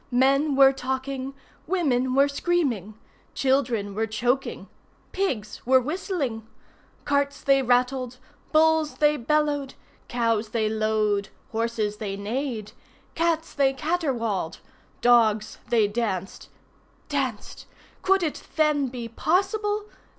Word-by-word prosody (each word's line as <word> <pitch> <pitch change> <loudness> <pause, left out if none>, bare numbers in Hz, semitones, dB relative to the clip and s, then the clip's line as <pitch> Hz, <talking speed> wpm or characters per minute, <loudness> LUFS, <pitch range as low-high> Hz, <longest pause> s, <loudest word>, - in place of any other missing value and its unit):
Men 275 +3 +3
were 270 0 +7
talking. 265 +1 -4 0.3
Women 260 -8 +1
were 275 +1 +5
screaming. 280 - -1 0.4
Children 250 -7 +1
were 220 +2 -1
choking. 245 +5 -1 0.4
Pigs 255 - -2
were 260 +1 +5
whistling. 295 - -3 0.6
Carts 280 0 0
they 275 -1 +4
rattled. 250 0 +1 0.3
Bulls 315 -1 +3
they 300 0 +3
bellowed. 290 +1 0 0.3
Cows 230 -2 0
they 220 -1 0
lowed. 215 -2 0 0.2
Horses 225 -2 -1
they 200 -2 -4
neighed. 220 0 -3 0.4
Cats 330 -1 0
they 275 -2 +2
caterwauled. 265 - -1 0.4
Dogs 220 -3 +3
they 225 -3 +4
danced. 205 -4 -3 0.6
Danced! 265 -7 -3 0.3
Could 385 -1 +3
it 310 - -2
then 300 -3 +2
be 240 -2 -6
possible? 410 - 0
260 Hz, 105 wpm, -25 LUFS, 225-295 Hz, 0.6 s, were